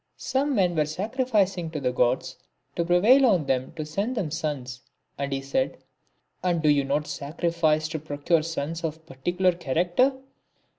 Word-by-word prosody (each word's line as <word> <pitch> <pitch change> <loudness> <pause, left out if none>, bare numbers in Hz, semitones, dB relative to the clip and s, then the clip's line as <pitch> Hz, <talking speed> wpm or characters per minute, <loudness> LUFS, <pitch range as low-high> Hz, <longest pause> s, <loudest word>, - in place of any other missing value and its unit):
Some 270 +2 0
men 180 -4 +2
were 155 -2 +2
sacrificing 195 - 0
to 160 -1 -4
the 125 -2 0
Gods 125 0 +1 0.4
to 170 - +1
prevail 200 +11 +5
on 190 - +4
them 130 -1 -1
to 155 -2 -5
send 200 +11 -2
them 175 -8 -1
sons, 140 -6 -4 0.3
and 140 0 -3
he 135 0 -1
said, 260 - -1 0.3
" - - -46
And 175 -2 +1
do 155 -1 +2
you 145 -1 +4
not 145 +2 0
sacri 150 +3 -3
fice 155 -2 +2
to 160 -1 -3
procure 155 +2 0
sons 165 +1 -4
of 160 -2 -2
a - - -22
particular 175 +6 0
character 175 - +1
165 Hz, 180 wpm, -26 LUFS, 145-180 Hz, 0.4 s, prevail